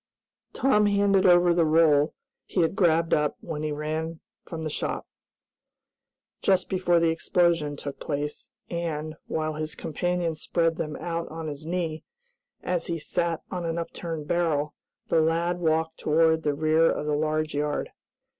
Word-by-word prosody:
Tom 210 -6 +3
handed 200 -2 +3
over 175 -1 +6
the 170 -1 +3
roll 155 -2 +4 0.3
he 185 - 0
had 165 +3 +1
grabbed 165 -3 +3
up 150 -1 +1
when 155 -3 -5
he 155 0 -2
ran 155 +2 -3 0.3
from 160 -1 -5
the 155 - -2
shop, - - -3 1.4
just 190 -2 +2
before 180 -2 +2
the 165 0 +3
explosion 165 -2 +1
took 140 0 -7
place, 150 0 -4 0.2
and, 155 -3 -3
while 155 0 -1
his 155 0 -4
companion 175 +1 -1
spread 165 +1 0
them 150 -1 -3
out 170 -1 -3
on 160 0 -6
his 150 +1 -7
knee, 165 -3 -2 0.6
as 180 -2 -1
he 170 - -1
sat 165 +1 -2
on 180 -2 -3
an 165 0 -2
upturned 165 -2 -5
barrel, 155 -4 0 0.4
the 160 - +4
lad 170 +2 +1
walked 160 -1 0
toward 160 +1 +3
the 150 -2 0
rear 155 +2 +3
of - - -2
the 150 - 0
large 155 +1 0
yard. 145 0 -1
160 Hz, 155 wpm, -26 LUFS, 155-170 Hz, 1.4 s, over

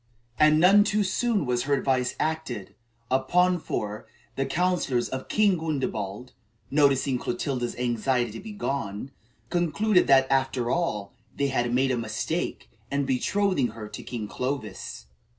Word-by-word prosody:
And 155 0 +6
none 195 +4 +7
too 210 0 +1
soon 200 -1 0
was 125 0 0
her 140 0 +2
advice 130 -2 0
acted, 130 -11 -3 0.4
upon 175 +8 +3
for, 105 -7 -4 0.3
the 135 0 -1
counsellors 155 -5 +1
of 130 0 -5
King 205 -5 +3
Gundebald, 125 -8 -3 0.4
noticing 140 -2 +3
Clotilda's 120 0 -2
anxiety 120 0 0
to 115 - -7
be 220 - -8
gone, 135 - -3 0.4
concluded 180 +4 +2
that, 135 -1 +6
after 130 -2 +1
all, 105 - -1 0.2
they 140 0 +1
had 120 -2 0
made 130 +2 +2
a 125 - 0
mistake 115 +9 -3 0.2
in 140 0 0
betrothing 145 +3 +1
her 110 -1 -6
to - - -7
King 115 -4 -5
Clovis. 125 - -4
135 Hz, 140 wpm, -26 LUFS, 120-165 Hz, 0.4 s, none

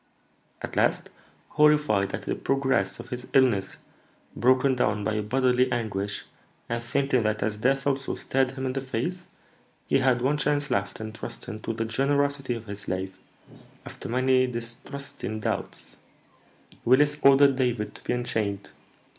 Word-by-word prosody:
At - - -5
last, - - +1 0.4
horrified 150 -10 +3
at - - -7
the - - -2
progress 135 -8 0
of - - -9
his 125 0 -6
illness, 115 -8 +3 0.6
broken 130 +3 +3
down 105 -4 0
by 105 +1 0
bodily 125 +3 +2
anguish, 105 -4 -2 0.4
and 115 0 -2
thinking 135 +1 +1
that, 110 -1 0
as 105 0 -2
death 135 +4 +1
also 140 -1 0
stared 130 -1 0
him 130 0 -4
in 130 - -1
the 135 - -2
face, 135 +8 -3 0.6
he 135 - +2
had 130 -2 +2
one 145 +3 +1
chance 145 0 0
left 100 -2 -1
in 110 0 -6
trusting 110 -1 -7
to 115 - -3
the 115 0 -2
generosity 140 +2 0
of 115 -1 -8
his 100 -1 -7
slave, 95 0 -4 0.7
after - - -8
many 130 +1 +3
distrusting 120 -1 -6
doubts, - - -4 0.9
Willis 145 +4 +4
ordered 140 0 +6
David 120 -5 -1
to - - -15
be - - -1
unchained." 105 -5 -2
125 Hz, 150 wpm, -26 LUFS, 110-135 Hz, 0.9 s, ordered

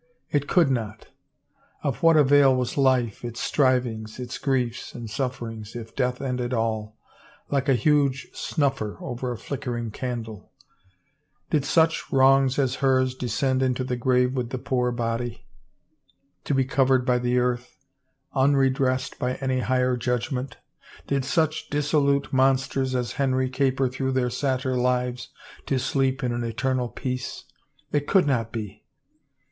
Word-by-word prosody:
It 145 -1 0
could 165 -5 +4
not 110 -3 -4 0.7
I 145 - +1
Of 130 - -5
what 165 -1 +6
avail 140 -2 +6
was 125 -1 -1
life, 130 -6 +2
its 120 -1 -5
strivings, 125 -5 0
its 125 0 -5
griefs 125 -4 -1
and 120 -1 -6
sufferings, 115 -3 -4
if 115 -1 -8
death 125 -1 0
ended 125 -2 -2
all, 110 -1 -2 0.5
like 140 -1 +1
a 135 - +5
huge 140 +1 +2
snuffer 135 -8 -1
over 125 0 -4
a 120 - -4
flickering 120 -2 -4
candle? 115 -3 -6 1.0
Did 150 -4 +2
such 160 -1 +2
wrongs 135 0 +4
as 135 -2 +1
hers 130 -1 +3
descend 130 +2 0
into 130 -1 +1
the 125 -1 -2
grave 125 +1 +2
with 125 -3 -2
the 130 - -3
poor 125 0 0
body, 120 0 -3 1.0
to 145 - 0
be 135 -1 +2
covered 130 -1 +2
by 125 -1 +2
the 125 0 0
earth, 125 0 -1 0.6
unredressed 135 -1 +2
by 125 0 -1
any 130 -1 -1
higher 125 0 +1
judgment? 125 +2 -2 0.5
Did 140 -1 0
such 155 +3 0
disso 150 0 +1
lute 140 0 +1
monsters 130 0 +2
as 125 -2 -1
Henry 130 -1 +1
caper 130 0 +1
through 130 +1 -2
their 125 -2 +1
satyr 130 -1 -1
lives 125 0 0 0.4
to 135 - +1
sleep 135 +1 0
in 125 - 0
an 120 0 -2
eternal 130 +1 -1
peace? 125 0 -5 0.5
It 145 -1 0
could 190 -4 +4
not 115 -5 0
be! 105 -4 -6
130 Hz, 150 wpm, -25 LUFS, 120-135 Hz, 1.0 s, what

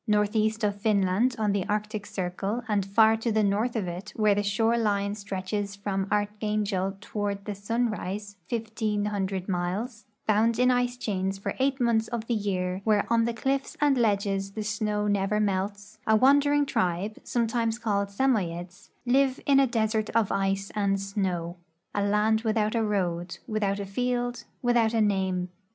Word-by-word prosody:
Northeast 215 +1 +1
of 205 -1 0
Finland, 210 +3 +2
on 215 -2 +1
the 200 -1 0
Arctic 210 0 -2
circle, 195 +5 -3
and 205 -3 +1
hir 220 0 +7
to 225 +1 -1
the 215 0 +2
north 210 +5 +1
of 205 -5 -1
it, 180 +4 -6
wliere 215 -2 +4
the 205 - +1
shore 225 +3 +1
line 205 -3 +1
stretches 200 0 -4
from 195 -1 -2
Archangel 205 -2 -1
toward 205 -1 -3
the 210 - -3
sunrise 205 -1 -2
fifteen 220 -2 -2
hundred 195 -2 -2
miles, 200 +6 -2 0.2
bound 220 +2 +3
in 250 +1 +4
ice 245 0 +1
chains 195 -4 -2
for 195 - -3
eight 270 +1 +1
months 230 -2 +2
of 235 -2 -4
the 235 - -1
year, 190 -3 -1
where 210 -1 +3
on 230 0 +4
the 235 - -1
cliffs 270 +3 -1
and 290 -2 +4
ledges 200 -4 0
the 215 - -3
snow 210 0 -1
never 205 +1 +1
melts, 205 +1 -2
a 220 - +5
wandering 285 +4 +4
tribe, 185 -2 -1
sometimes 230 -1 0
called 205 -4 0
Samoyeds, 190 -6 -1 0.2
live 265 +1 +3
in 275 -1 +5
a 270 - +5
desert 220 -2 0
of 225 -4 +3
ice 195 0 0
and 200 -2 +1
snow 185 -3 -2 0.2
— 170 +3 -50
a 205 - 0
land 210 +2 +2
without 215 -1 +1
a 230 - +1
road, 175 -4 -1
with 215 -3 -2
out 200 0 0
a 200 - -3
field, 245 +3 -2 0.2
without 235 -2 +3
a - - +3
name. 190 -3 +1
210 Hz, 170 wpm, -27 LUFS, 195-225 Hz, 0.2 s, hir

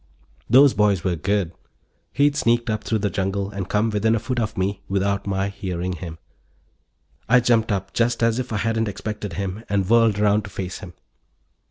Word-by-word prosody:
Those 135 +3 +7
boys 100 -4 +2
were 90 -2 0
good. 95 +1 -1 0.6
He'd 145 +1 +2
sneaked 120 -3 +1
up 110 0 -2
through 110 - 0
the 100 - 0
jungle 95 +1 -2
and 100 -2 -5
come 105 +2 +1
within 110 +2 +2
a - - 0
foot 120 +2 -3
of 110 -2 -2
me 95 +1 -1
without 100 +1 0
my 95 0 0
hearing 95 -2 -4
him. 85 -2 -7 1.1
I 125 +2 +7
jumped 115 -2 +2
up 95 -1 -2
just 115 0 +1
as 115 +1 +2
if 130 -1 -4
I 110 - -1
hadn't 115 +1 0
expected 105 -1 -5
him 100 +4 -4
and 100 -2 0
whirled 115 -2 +4
around 105 0 +3
to - - -8
face 95 -1 -5
him. 90 -5 -10
105 Hz, 190 wpm, -22 LUFS, 95-115 Hz, 1.1 s, Those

